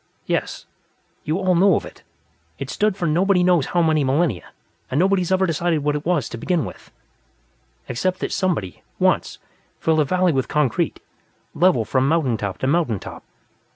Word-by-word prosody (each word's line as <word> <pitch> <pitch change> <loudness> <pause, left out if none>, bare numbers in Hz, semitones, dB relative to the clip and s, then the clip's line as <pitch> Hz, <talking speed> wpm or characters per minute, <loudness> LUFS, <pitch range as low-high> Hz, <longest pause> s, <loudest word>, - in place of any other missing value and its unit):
"Yes. - - -2 0.6
You 155 +3 0
all 185 -1 +1
know 190 +3 +4
of - - -2
it. - - -13 0.6
It's - - -5
stood 210 -2 0
for 175 - -2
nobody 180 +4 +2
knows 175 -6 +3
how 175 -1 +1
many 155 -2 +2
millennia, 135 - 0 0.4
and 135 - 0
nobody's 190 -1 +2
ever 190 0 +3
decided 165 -2 0
what 150 0 +1
it 150 +2 -4
was, 175 -6 +1
to 115 - -7
begin 175 +3 0
with, - - -11 1.0
except 180 +10 -1
that - - -2
somebody, 170 - -2 0.2
once, - - +1 0.4
filled 160 -1 +1
a - - +5
valley 180 +4 +2
with 135 -3 -1
concrete, 150 -6 0 0.5
level 165 -8 +3
from 130 +4 +1
mountain 150 -6 +1
top 100 -2 -4
to - - -3
mountain 145 -6 +1
top. - - -10
165 Hz, 175 wpm, -21 LUFS, 135-180 Hz, 1.0 s, a